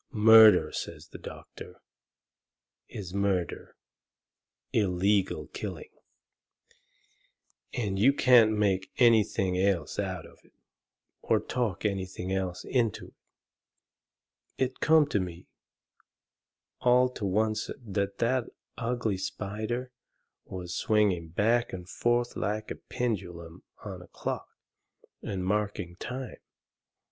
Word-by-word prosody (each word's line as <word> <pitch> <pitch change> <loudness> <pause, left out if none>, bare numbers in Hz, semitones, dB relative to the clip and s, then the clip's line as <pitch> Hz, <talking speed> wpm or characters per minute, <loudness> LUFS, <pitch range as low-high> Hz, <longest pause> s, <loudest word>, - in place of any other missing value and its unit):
"Murder," 110 - +7
says 80 -1 -6
the - - -10
doctor, - - -11 1.1
"is 95 -3 -7
murder 100 -3 -1 1.0
illegal 100 -1 +1
killing - - -6 1.8
and 100 -6 -2
you 125 +7 +6
can't 125 -5 +6
make 100 -3 0
anything 105 -6 +3
else 95 -5 0
out 95 -4 -3
of - - -17
it, - - -26 0.7
or - - +2
talk 115 -6 -2
anything 95 -2 -2
else 95 -2 -3
into 115 -6 -1
it." - - -28 1.4
It 130 0 -1
come 160 -1 +5
to 105 - +1
me 90 -1 -6 1.3
all 125 +1 +4
to 110 -5 -5
oncet 110 0 -1
that 100 -1 -2
that 125 +1 +1 0.3
ugly 115 -5 -1
spider 110 +6 -4 0.5
was 90 -2 -6
swinging 100 -7 +1
back 115 +8 +1
and 90 -1 -7
forth 120 +3 0
like 105 0 -2
the - - -4
pendulum 90 -7 -4 0.2
on - - -7
a - - -13
clock, - - -5 0.7
and 95 -2 -4
marking 105 -3 -1
time. 125 +5 -6
105 Hz, 105 wpm, -29 LUFS, 95-115 Hz, 1.8 s, Murder